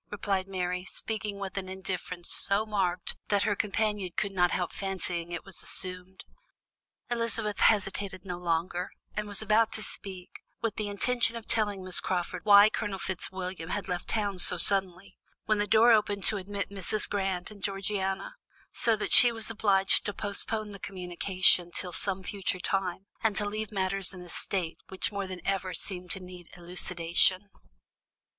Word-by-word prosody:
replied 195 -2 -2
Mary, 180 -1 -2
speaking 210 +1 -3
with 195 -1 -6
an 190 -1 -4
indifference 185 -2 -2
so 200 +2 +5
marked 190 -4 -1
that 205 -1 +2
her 205 -1 +1
companion 210 -2 -1
could 200 - 0
not 180 -2 +3
help 180 -1 -2
fancying 180 -3 -2
it 175 - -5
was 195 - -1
assumed. 185 0 -4 0.9
Elizabeth 230 -3 -1
hesitated 200 -2 +1
no 180 -2 -5
longer, 175 +1 -1 0.3
and 210 0 -3
was 205 +1 -2
about 220 +1 +3
to 215 - 0
speak, 185 -4 -6 0.2
with 230 -2 -1
the 210 -1 -3
intention 230 +3 +1
of 230 -1 -7
telling 205 -4 0
Miss 185 -1 0
Crawford 180 0 -3
why 205 0 +9
Colonel 205 -2 -3
Fitzwilliam 185 -2 -5
had 205 +1 -3
left 180 -1 -3
town 205 -4 -1
so 180 - +3
suddenly, 190 0 0 0.3
when 215 -1 +1
the 205 - 0
door 225 +3 +6
opened 205 -3 +2
to 215 - +1
admit 200 +1 -5
Mrs. 200 +2 0
Grant 190 -2 -2
and 205 -2 -13
Georgiana, 195 - -2 0.3
so 230 -2 +1
that 210 - -1
she 245 - +10
was 225 -1 -2
obliged 200 -3 +3
to 205 - -3
postpone 210 +1 -3
the 200 - -9
communication 180 -1 +3
till 175 0 -4
some 190 +1 0
future 190 -1 -2
time, 190 0 -2 0.2
and 220 -2 +1
to 205 - +2
leave 215 0 -4
matters 195 -1 -1
in 180 - -9
a 175 - -13
state 175 -1 -3
which 190 - -1
more 200 -1 -3
than 185 -1 -7
ever 190 -2 -1
seemed 180 -2 -3
to 190 - +1
need 180 -2 -12
elucidation. 180 +2 +2
195 Hz, 170 wpm, -29 LUFS, 180-205 Hz, 0.9 s, she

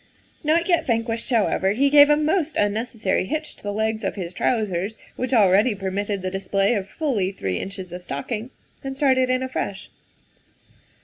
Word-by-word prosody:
Not 325 +3 +2
yet 345 -3 +2
van 230 -2 +2
quished, 230 +1 -3
however, 205 -4 +2
he 275 +5 +2
gave 290 0 +8
a 295 - +5
most 315 +1 0
unnecessary 210 -1 0
hitch 305 +1 -3
to - - -18
the 205 - -3
legs 220 +1 -1
of 195 - -2
his 180 -3 -5
trousers, 205 0 -1 0.2
which 255 +1 -3
already 210 0 +4
permitted 195 0 -3
the 185 - -2
display 195 +2 +1
of 200 -3 -3
fully 235 - -1
three 95 - -3
inches 190 -2 -6
of 180 +1 -7
stocking, 210 - -4 0.3
and 270 0 -5
started 260 -2 +3
in 255 0 +1
afresh. 230 -6 -4
220 Hz, 175 wpm, -23 LUFS, 195-260 Hz, 0.3 s, gave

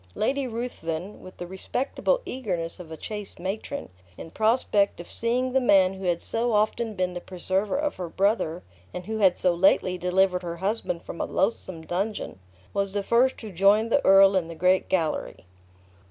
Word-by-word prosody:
Lady 270 +4 0
Ruthven, 210 -7 -5
with 185 - -12
the 175 - -6
respectable 250 - -1
eagerness 185 -10 -4
of 165 -3 -10
a 160 - -6
chaste 210 +2 -7
matron, 190 - -4 0.3
in 165 - -9
prospect 215 -3 +2
of 170 - -10
seeing 250 +2 -1
the 265 - +3
man 195 -6 +5
who 190 0 -7
had 175 -1 0
so 235 +1 0
often 215 +1 +1
been 185 -1 -1
the 175 - -5
preserver 190 +6 -2
of 295 0 -2
her 180 -2 -5
brother, 190 -3 0 0.3
and 180 0 -5
who 220 +2 -3
had 190 -4 +4
so 180 - +2
lately 180 0 +3
delivered 180 0 +2
her 170 -1 -5
husband 190 -2 -2
from 170 - -6
a - - 0
loathsome 185 -5 -1
dungeon, 195 - -3 0.3
was 200 -1 -1
the 205 -1 -1
first 250 +5 +2
who 215 -3 -7
joined 200 +5 +3
the 285 - +3
earl 195 0 +7
in 180 -3 +1
the 165 - -8
great 185 +3 +2
gallery. 160 - -1
195 Hz, 185 wpm, -26 LUFS, 180-220 Hz, 0.3 s, earl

